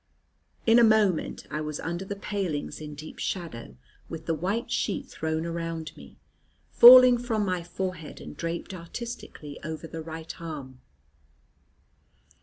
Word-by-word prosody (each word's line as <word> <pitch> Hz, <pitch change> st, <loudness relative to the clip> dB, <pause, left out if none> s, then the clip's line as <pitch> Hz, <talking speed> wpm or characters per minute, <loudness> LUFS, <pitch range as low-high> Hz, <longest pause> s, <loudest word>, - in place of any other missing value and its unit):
In 230 Hz, +1 st, +6 dB
a -, -, +7 dB
moment 215 Hz, -6 st, +2 dB
I 150 Hz, +1 st, -2 dB
was 150 Hz, -1 st, -4 dB
under 170 Hz, +3 st, -3 dB
the 200 Hz, +1 st, -5 dB
palings 195 Hz, -8 st, -3 dB
in 150 Hz, -1 st, -7 dB
deep 155 Hz, +2 st, -10 dB
shadow, 160 Hz, -, -4 dB, 0.3 s
with 160 Hz, -1 st, -7 dB
the 165 Hz, -, 0 dB
white 200 Hz, -, -2 dB
sheet 275 Hz, +3 st, -1 dB
thrown 160 Hz, -4 st, -3 dB
around 165 Hz, -2 st, -4 dB
me, -, -, -14 dB, 0.5 s
falling 250 Hz, 0 st, +10 dB
from 225 Hz, -4 st, -1 dB
my 185 Hz, -2 st, -1 dB
forehead, 175 Hz, -2 st, -5 dB
and -, -, -9 dB
draped 170 Hz, +3 st, -4 dB
artistically 170 Hz, -5 st, -8 dB
over 160 Hz, +1 st, -5 dB
the 165 Hz, 0 st, -7 dB
right 160 Hz, +1 st, -8 dB
arm. 140 Hz, -6 st, -7 dB
170 Hz, 140 wpm, -27 LUFS, 160-200 Hz, 0.5 s, falling